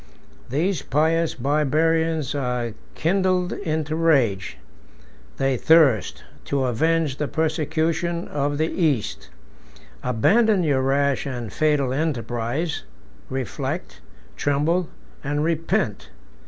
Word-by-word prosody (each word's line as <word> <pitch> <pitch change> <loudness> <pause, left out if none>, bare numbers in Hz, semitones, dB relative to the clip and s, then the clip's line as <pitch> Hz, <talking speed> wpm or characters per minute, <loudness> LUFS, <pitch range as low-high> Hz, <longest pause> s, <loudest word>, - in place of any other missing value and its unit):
These 165 +9 0
pious 160 +4 +1
Barbarians 155 +2 +1
are 125 -4 -2 0.2
kindled 185 +1 +1
into 155 -4 -2
rage: 130 - +2 0.8
they 135 -1 +1
thirst 145 - +4 0.2
to 140 -1 0
avenge 150 +3 +1
the 150 - -1
persecution 160 +2 -1
of 145 0 -1
the 155 - +2
East. 105 - -1 0.7
Abandon 195 - +3
your 140 -4 +2
rash 140 +1 +1
and 120 -6 -5
fatal 150 -4 +1
enterprise; 130 +1 -2 0.5
reflect, 130 - -4 0.4
tremble, 155 +5 +1 0.3
and 145 +1 -1
repent. 165 - -1
150 Hz, 95 wpm, -23 LUFS, 130-165 Hz, 0.8 s, thirst